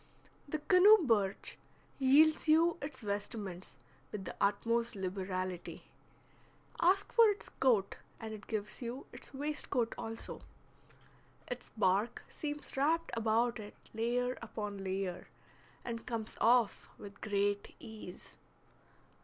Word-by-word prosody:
The 310 - -1
canoe 370 +7 +7
birch 205 -5 0 0.4
yields 300 +5 +5
you 330 +2 +4
its 285 -2 -6
vestments 200 -5 -4 0.3
with 200 -3 -5
the - - -6
utmost 230 +4 +1
liberality. 185 -1 -4 0.9
Ask 380 +4 +3
for 460 -2 +7
its 410 - -3
coat, 220 -7 +2 0.2
and 220 -1 -6
it 210 -1 -10
gives 210 +1 -4
you 245 +3 -5
its - - -11
waistcoat 275 -4 -1
also. 225 0 -5 1.1
Its 245 0 -6
bark 205 +3 +1
seems 295 -1 -5
wrapped 320 +5 +1
about 230 +1 +1
it 210 -1 -9 0.2
layer 245 +3 0
upon 210 -3 -5
layer, 190 -1 -3 0.6
and 230 -1 -5
comes 225 -2 -3
off 235 -1 +3
with 200 0 -11
great 205 -1 0
ease. 215 -5 -10
225 Hz, 115 wpm, -34 LUFS, 205-270 Hz, 1.1 s, canoe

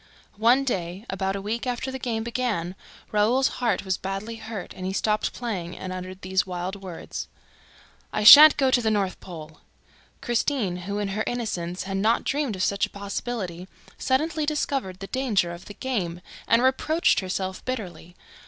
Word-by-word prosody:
One 240 +5 +5
day, 185 -5 -3
about 190 0 -1
a 200 - -4
week 230 +5 -3
after 250 +2 -2
the 265 - -5
game 230 -3 -2
began, 230 -8 -2 0.4
Raoul's 230 +6 +3
heart 235 -4 0
was 190 -1 0
badly 195 +4 -5
hurt 220 -4 -7
and 185 - -9
he 190 - -2
stopped 210 +2 0
playing 190 -8 -5
and 185 0 -5
uttered 185 +1 -7
these 190 0 +1
wild 180 +1 -4
words: 185 -3 -7 0.8
"I 215 - -1
shan't 295 +7 +11
go 265 -2 +3
to 245 - +4
the 220 - +1
North 200 -3 0
Pole!" 160 -3 -10 0.6
Christine, 240 -5 0
who, 200 0 -2
in 205 -1 -1
her 210 +3 -1
innocence, 185 -7 -3
had 195 0 -3
not 220 +4 +2
dreamed 280 -6 -1
of 185 - -2
such 200 +1 +1
a - - -23
possibility, 200 -3 -5 0.3
suddenly 300 +3 0
discovered 270 - -2
the - - -4
danger 215 -7 0
of 175 +1 -9
the 205 - -10
game 180 -10 -3 0.3
and 230 +2 +4
reproached 310 +5 +3
herself 190 0 -3
bitterly. 180 -9 -6
205 Hz, 170 wpm, -25 LUFS, 185-245 Hz, 0.8 s, shan't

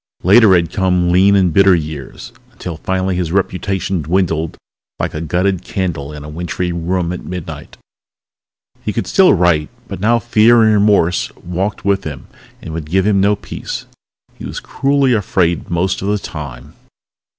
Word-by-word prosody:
Later 100 +1 +6
had 85 -1 0
come 90 -2 +1
lean 95 +3 +5
and 90 -4 +2
bitter 95 0 +5
years 75 -4 -6 0.2
until 85 -3 -7
finally 95 +2 -1
his 90 -3 -2
reputation 95 -1 -1
dwindled 80 0 -1 0.4
like - - -3
a 75 - -4
gutted 90 +3 0
candle 80 -7 -3
in 75 -1 -9
a - - -9
wintry 85 +3 -3
room 85 +1 -2
at 90 - -7
midnight. 80 -5 -8 1.1
He - - -2
could - - -2
still - - +4
write 85 -4 +2 0.2
but - - -6
now 115 +4 +3
fear 115 0 +4
and 110 -1 +4
remorse 100 -4 +2
walked 95 +4 -4
with 100 -1 +1
him 75 -4 -7 0.4
and 80 - -7
would 80 -2 -6
give 95 +2 +2
him 100 -2 +3
no 100 +1 +3
peace. - - -7 0.5
He - - -9
was - - -5
cruelly 140 -2 +1
afraid 90 -5 0
most 90 +2 -1
of 95 - -3
the 105 +1 +1
time. 75 -7 -8
90 Hz, 165 wpm, -16 LUFS, 80-100 Hz, 1.1 s, Later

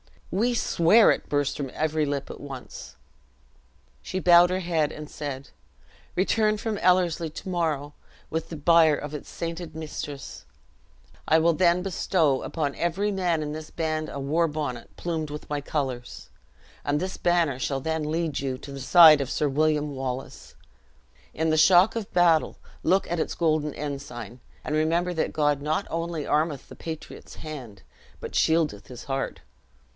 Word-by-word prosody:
"We 235 +6 +1
swear 210 +1 +5
it," - - -2
burst 145 -1 0
from 140 -2 -4
every 155 0 0
lip 140 -1 -3
at - - -9
once. 135 -3 -9 1.1
She 185 - -5
bowed 175 -1 +6
her 185 +1 -1
head, 160 -4 0
and 150 0 -8
said, 140 -2 -6 0.7
"Return 215 +3 +2
from 215 0 -3
Ellerslie 175 -2 +2
to 185 - -8
morrow, 155 -5 -1 0.4
with 160 0 -2
the 165 - -6
bier 160 0 +5
of 145 +1 -6
its 150 - -7
sainted 170 -1 -5
mistress, 150 -3 -7 0.8
I 160 - +5
will 165 +1 +4
then 175 +1 +3
bestow 165 -6 +1
upon 145 -4 -2
every 185 +5 0
man 175 -5 0
in 150 - -4
this 155 0 -7
band 155 -1 -2
a 140 - -6
war 160 +5 +1
bonnet 145 -6 -5
plumed 160 -3 -3
with 150 +1 -8
my 145 -1 -1
colors; 135 -4 -4 0.6
and 145 +1 +1
this 185 +2 -4
banner 170 -7 +1
shall 135 0 -2
then 160 0 -2
lead 160 -1 -1
you 135 -2 -2
to 140 - -10
the 140 - -7
side 155 +1 +8
of 135 - -3
Sir 150 - 0
William 150 0 +1
Wallace. 130 -1 -6 0.8
In 160 0 0
the 155 - +2
shock 180 +6 +6
of 225 -3 -4
battle 170 -3 +3 0.2
look 190 +4 +2
at 175 - 0
its - - -2
golden 155 -3 +1
ensign, 130 -5 -6 0.2
and - - -3
remember 170 +3 +1
that 160 - -1
God 145 -2 +1
not 155 +6 -1
only 165 -2 -3
armeth 150 -2 0
the - - -10
patriot's 160 -1 -8
hand, 130 -11 -9 0.4
but - - -7
shieldeth 160 -10 +1
his 125 -1 -9
heart. 135 0 -3
155 Hz, 165 wpm, -26 LUFS, 145-170 Hz, 1.1 s, side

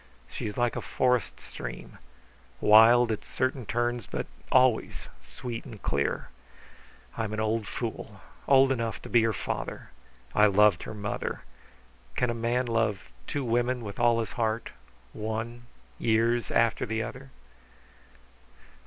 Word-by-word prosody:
She - - -5
is 105 - -6
like 120 -1 +1
a - - -2
forest 125 -2 0
stream, - - -8 0.6
wild 115 +2 +7
at 110 - -3
certain 130 -3 -2
turns, 120 0 -1
but - - -3 0.3
always 130 -3 +2
sweet 115 - -7
and 110 - -10
clear. 70 -5 -1 0.9
I'm 110 -2 -3
an 110 - -3
old 110 0 0
fool, 110 -3 -5 0.3
old 135 -1 +6
enough 115 -3 -2
to - - -8
be 120 - +5
her 115 0 +2
father. - - -5 0.4
I 105 0 +6
loved 100 -2 +4
her - - -7
mother. 100 -1 -4 0.7
Can 125 -1 +1
a - - -2
man 120 +2 0
love 115 -4 -1 0.2
two 145 - -2
women 120 +1 0
with 100 -2 -7
all 120 -1 +4
his 110 - -5
heart, 115 -1 -2 0.4
one 115 +2 -5 0.3
years 115 +1 +2
after 115 -1 +2
the 110 +1 -1
other?" 135 +4 -8
115 Hz, 140 wpm, -28 LUFS, 110-120 Hz, 0.9 s, wild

